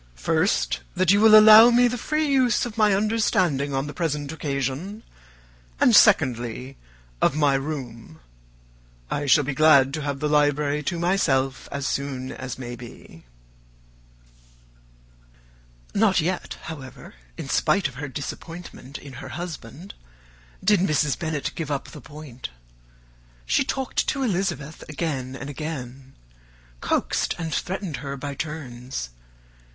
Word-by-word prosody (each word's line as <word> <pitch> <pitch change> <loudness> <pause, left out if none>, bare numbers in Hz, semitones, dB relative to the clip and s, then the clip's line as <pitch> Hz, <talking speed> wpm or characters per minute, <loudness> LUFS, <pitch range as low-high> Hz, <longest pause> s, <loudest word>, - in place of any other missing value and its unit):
First, 60 0 +1 0.2
that 185 -1 +3
you 205 +1 +4
will 215 -1 +9
allow 215 +2 +9
me 245 +1 +5
the 245 - -2
free 305 +6 -1
use 255 -5 +2
of 235 -3 -7
my 210 -3 +3
understanding 185 -9 +1
on 135 +1 -1
the 145 - -7
present 150 -4 -2
occasion; 150 - -4 0.8
and, - - +5
secondly, 125 +2 +3 0.5
of - - +3
my 145 -2 +3
room. 130 - -5 0.9
I 145 - -2
shall 145 +2 +5
be 140 +1 -3
glad 140 -2 +5
to 155 - -3
have 140 -1 -3
the 150 - -1
library 150 0 +2
to 175 - -1
myself 140 -7 0
as 140 -1 -4
soon 135 -2 -3
as 130 -1 -6
may 120 -2 -6
be." 115 - -13 2.7
Not 200 -3 +3
yet, 175 +3 -2
however, 140 -5 -9 0.2
in - - -6
spite 200 -5 +2
of 135 - -11
her 145 +4 -6
disappointment 145 +1 -8
in 140 -2 -11
her - - -8
husband, 170 - -8 0.7
did 205 0 +4
Mrs. 150 -5 +1
Bennet 155 -4 -2
give 160 -3 -5
up 140 -2 -3
the - - -11
point. 145 -5 -9 1.0
She - - +2
talked 265 -1 -2
to 275 - -1
Elizabeth 180 - -2
again 135 -4 -3
and 135 +1 -7
again; 135 -3 -7 0.6
coaxed - - 0
and 165 -2 -4
threatened 185 -4 -3
her 140 -1 -6
by 145 +1 -5
turns. 130 - -6
150 Hz, 135 wpm, -24 LUFS, 135-180 Hz, 2.7 s, will